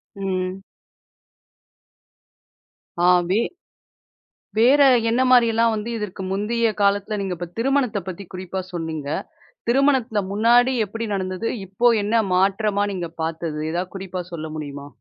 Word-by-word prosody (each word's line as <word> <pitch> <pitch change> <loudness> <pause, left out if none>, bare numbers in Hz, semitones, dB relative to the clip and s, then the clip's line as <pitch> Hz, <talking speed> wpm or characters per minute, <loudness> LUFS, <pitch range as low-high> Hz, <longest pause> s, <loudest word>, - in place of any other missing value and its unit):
ம். 190 -1 -3 2.4
ஆ. - - +1 0.3
வே 215 - +3 1.2
வேற 255 +6 +5 0.3
என்ன 245 +3 +2
மாதிரிலாம், 230 -2 +4
வந்து 215 +2 -4
இதற்கு 200 -2 -5
முந்தய 225 +3 +1
காலத்துல 200 +1 +2
நீங்க 190 -2 -2
இப்ப 175 0 -6
திருமணத்த 255 -3 +1
பத்தி 190 +2 -6
குறிப்பா 185 +1 -4
சொன்னீங்க. 160 -4 -4 0.6
திருமணத்த 255 -4 +2
முன்னாடி 240 +5 +4
எப்டி 225 +3 -5
நடந்தது, 185 +3 -2 0.2
இப்ப 230 +6 +3
என்ன 210 +3 -1 0.2
மாற்றமா 200 +2 +2
நீங்க 175 -3 -4
பாத்தது? 160 -1 -3
எதாவது 180 +3 -3
குறிப்பா 185 -1 -5
சொல்ல 160 -1 -5
முடியுமா? 145 -2 -6
200 Hz, 115 wpm, -22 LUFS, 185-230 Hz, 2.4 s, வேற